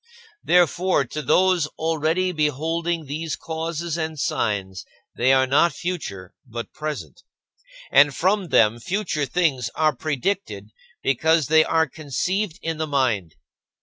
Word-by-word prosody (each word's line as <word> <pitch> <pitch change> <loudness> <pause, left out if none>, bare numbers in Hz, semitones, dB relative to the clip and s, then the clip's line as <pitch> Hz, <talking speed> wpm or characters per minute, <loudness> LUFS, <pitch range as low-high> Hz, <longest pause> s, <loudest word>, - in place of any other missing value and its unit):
Therefore, 175 -2 +3
to 150 +5 -5
those 175 +3 +3
already 165 +3 0
beholding 165 +2 -1
these 155 +2 -4
causes 165 0 -4
and 160 -1 -3
signs, 95 -8 -2 0.3
they 130 +2 +3
are 130 0 +4
not 145 +5 +3
future, 145 - -5
but 115 -1 -7
present, 155 -1 -6 0.7
and 145 -1 +5
from 195 +2 +1
them 115 -5 +3
future 155 - -2
things 135 -8 0
are 155 -1 +2
predicted 140 - -3 0.3
because 155 +2 +2
they 160 0 +6
are 160 -1 +2
conceived 160 - -2
in 160 -1 -3
the 155 - -1
mind. 120 - 0
155 Hz, 125 wpm, -23 LUFS, 130-170 Hz, 0.7 s, they